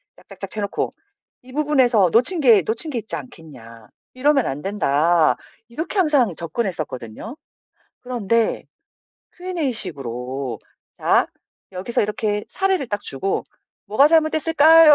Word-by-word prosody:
짝, - - -22
짝, - - -13
짝 - - -5
채 215 - -4
놓고 200 - -2 0.5
"이 255 - -15
부분에서 260 -9 +3
놓친 255 +10 +3
게 235 -9 +6
놓친 225 - -2
게 255 - -3
있지 220 - -4
않겠냐. 115 - -11 0.3
이러면 275 0 +2
안 140 +2 -3
된다." 170 -4 +2 0.3
이렇게 315 - -5
항상 290 - +3
접근했었거든요. 170 - -5 0.7
그런데 230 -2 0 0.7
Q&A식으로 140 - -4 0.4
"자. - - +2 0.5
여기서 190 +6 -1
이렇게" 210 0 -1
사례를 380 -8 0
딱 205 -1 -2
주고 165 +9 -1 0.4
"뭐가 215 +8 +5
잘못됐을까요?" 315 0 +6
225 Hz, 275 characters per minute, -21 LUFS, -, 0.7 s, 게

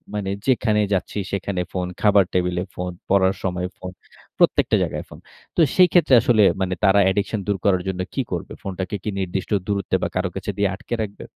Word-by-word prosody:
মানে 100 -2 -2 0.2
যেখানেই 110 -4 +2
যাচ্ছি 95 - -2
সেখানে 95 -1 -2
ফোন, 90 -1 -2
খাবার 100 -2 +5
টেবিলে 90 -1 0
ফোন, 90 0 -3 0.2
পড়ার 95 -1 +3
সময় 90 -1 -2
ফোন, 90 - -7 0.5
প্রত্যেকটা - - +3
জায়গায় - - -4
ফোন। - - -12 0.4
তো 170 - +3
সেই 180 -1 +7
ক্ষেত্রে 160 -6 +4
আসলে 110 -4 +4 0.2
মানে 95 -1 0
তারা 100 +1 +5
অ্যাডিকশন 100 +3 0
দূর 100 -1 +1
করার 95 -3 +3
জন্য 95 -1 -3
কি 135 - 0
করবে? 85 - -4
ফোনটাকে 95 +1 -4
কি 105 - -2
নির্দিষ্ট 95 +2 -3 0.2
দূরত্বে 100 -2 -1
বা - - +2
কারো - - 0
কাছে - - -3
দিয়ে 100 -1 +2
আটকে 120 - -5
রাখবে? 100 -1 -8
95 Hz, 190 wpm, -22 LUFS, 90-105 Hz, 0.5 s, সেই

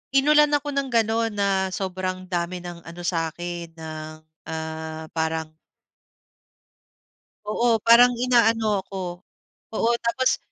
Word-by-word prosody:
inulan 300 +2 +5
ako 290 0 -2
ng 275 -1 -1
gano'n 225 0 +2
na 200 -1 +1 0.2
sobrang 185 -1 -3
dami 175 0 -2
ng 175 -1 -8
ano 170 +2 -9
sa'kin 170 0 -3
ng, 155 -1 -7 0.4
ah, 160 0 -5
parang 160 -1 -2 1.9
Oo, 225 +1 +2
parang 240 +2 +7
inaano 225 -5 +2
ako. 185 -1 -6 0.5
Oo, 225 +1 +1
tapos 235 +3 +1
185 Hz, 110 wpm, -24 LUFS, 165-230 Hz, 1.9 s, parang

